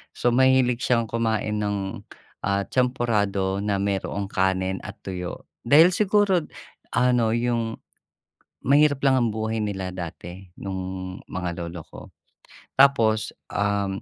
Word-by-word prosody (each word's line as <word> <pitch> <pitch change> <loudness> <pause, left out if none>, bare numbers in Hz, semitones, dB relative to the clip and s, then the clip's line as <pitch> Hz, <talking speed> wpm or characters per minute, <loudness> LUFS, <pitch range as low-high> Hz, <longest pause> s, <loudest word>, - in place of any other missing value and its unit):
So, 120 - +1
mahilig 130 -2 +4
siyang 120 -2 +2
kumain 110 -2 -1
ng, 100 -2 -2 0.5
ah, 100 0 +1
champorado 105 -7 +1
na 105 -1 0
mayroong 100 0 -2
kanin 95 0 0
at - - -9
tuyo. 90 -2 -5 0.2
Dahil 160 +7 +7
siguro 205 -2 +3 0.6
ano, 125 -3 +3
yung 115 -1 -1 0.9
mahirap 145 +1 +4
lang 135 - +5
ang 120 -2 +2
buhay 110 0 -2
nila 95 -3 -3
dati 90 +1 -8
nung 95 -1 -5
mga 90 -1 -4
lolo 85 0 -7
ko. - - -11 0.8
Tapos, 115 -6 +4 0.2
um, 100 -1 -1
105 Hz, 120 wpm, -24 LUFS, 95-125 Hz, 0.9 s, Dahil